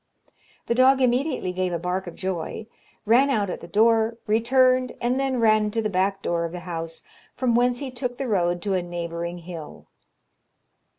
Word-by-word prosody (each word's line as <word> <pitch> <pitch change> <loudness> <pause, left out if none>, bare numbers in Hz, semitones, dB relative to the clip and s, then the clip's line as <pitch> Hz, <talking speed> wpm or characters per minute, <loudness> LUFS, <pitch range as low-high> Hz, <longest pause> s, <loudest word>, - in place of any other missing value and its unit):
The - - 0
dog 260 +2 +5
immediately 255 -4 +1
gave 185 0 -1
a 170 - -1
bark 180 +2 -3
of 175 - -8
joy, 190 +3 -4 0.4
ran 245 +6 +4
out 205 -7 0
at - - -6
the 170 - -9
door, 225 +4 +3
returned, 255 +3 +3
and 245 +2 0
then 265 -2 0
ran 215 -2 +3
to 225 +2 -1
the 215 - -1
back 195 +1 0
door 170 -1 0
of 170 0 -4
the 180 - -6
house, 165 -2 -6 0.3
from 255 -2 +1
whence 245 +1 +3
he 265 0 -5
took 245 -1 -4
the 270 - -3
road 175 -5 0
to 200 -2 -1
a 185 - +1
neighbouring 170 0 -5
hill. 170 -3 -9
210 Hz, 185 wpm, -24 LUFS, 175-245 Hz, 0.4 s, dog